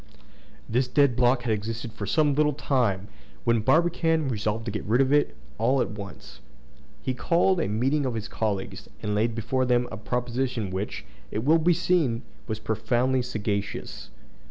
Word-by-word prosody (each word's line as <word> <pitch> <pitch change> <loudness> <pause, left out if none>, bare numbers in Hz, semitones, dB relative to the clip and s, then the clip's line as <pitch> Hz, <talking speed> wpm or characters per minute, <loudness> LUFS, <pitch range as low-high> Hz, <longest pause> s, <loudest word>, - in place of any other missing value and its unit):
This 125 +3 +1
dead 135 -1 +3
block 125 0 +3
had 115 -3 +1
existed 110 +2 -4
for 105 -3 -5
some 150 +5 +3
little 150 +1 +3
time, 120 -9 0 0.4
when 115 -1 +3
Barbicane 165 +1 +2
resolved 110 -1 -2
to 115 - -2
get 105 - -4
rid 115 +4 +2
of 135 +1 +3
it 145 - +3 0.2
all 130 +4 +3
at 125 - 0
once. 100 -3 -9 0.6
He 130 - -1
called 175 +7 +2
a - - 0
meeting 130 +7 +1
of 120 - -2
his 110 -1 -4
colleagues, 105 -4 -3
and 105 - -1
laid 110 +2 +1
before 120 +3 0
them 125 -1 +2
a 110 - -5
proposition 125 -1 -2
which, 95 +3 -4 0.2
it 105 +6 -3
will 160 +5 +5
be 170 +2 +3
seen, 165 -9 +1 0.2
was 110 -2 -2
profoundly 125 +4 0
sagacious. 105 -4 -4
120 Hz, 170 wpm, -26 LUFS, 110-135 Hz, 0.6 s, will